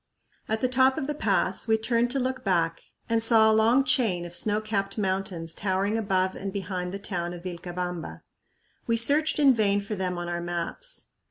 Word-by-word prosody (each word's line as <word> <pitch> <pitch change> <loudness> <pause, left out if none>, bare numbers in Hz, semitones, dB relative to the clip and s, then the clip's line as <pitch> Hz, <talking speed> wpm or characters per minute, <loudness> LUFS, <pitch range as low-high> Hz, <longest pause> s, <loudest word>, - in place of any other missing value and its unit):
At 220 0 -1
the 255 - +3
top 260 +1 +3
of - - -2
the 295 - -2
pass 195 -6 0
we 220 0 +3
turned 235 +2 +1
to 270 +2 0
look 260 0 -2
back 165 -4 0 0.3
and 230 -1 +1
saw 225 -1 +5
a - - +3
long 230 +5 +4
chain 215 -11 +1
of 175 - -9
snow 210 +2 +2
capped 200 -2 -3
mountains 190 -4 -2
towering 195 +3 -1
above 190 -4 0
and 195 0 -5
behind 185 -2 -4
the 195 - -4
town 175 -3 -4
of 175 -1 -9
Vilcabamba. 175 -1 -5 0.6
We 230 -1 +2
searched 290 +7 +3
in 280 -3 +6
vain 205 -3 +2
for 200 +1 -5
them 185 -3 -2
on 175 0 -4
our 175 0 -3
maps. 175 - -4
200 Hz, 195 wpm, -26 LUFS, 180-230 Hz, 0.6 s, in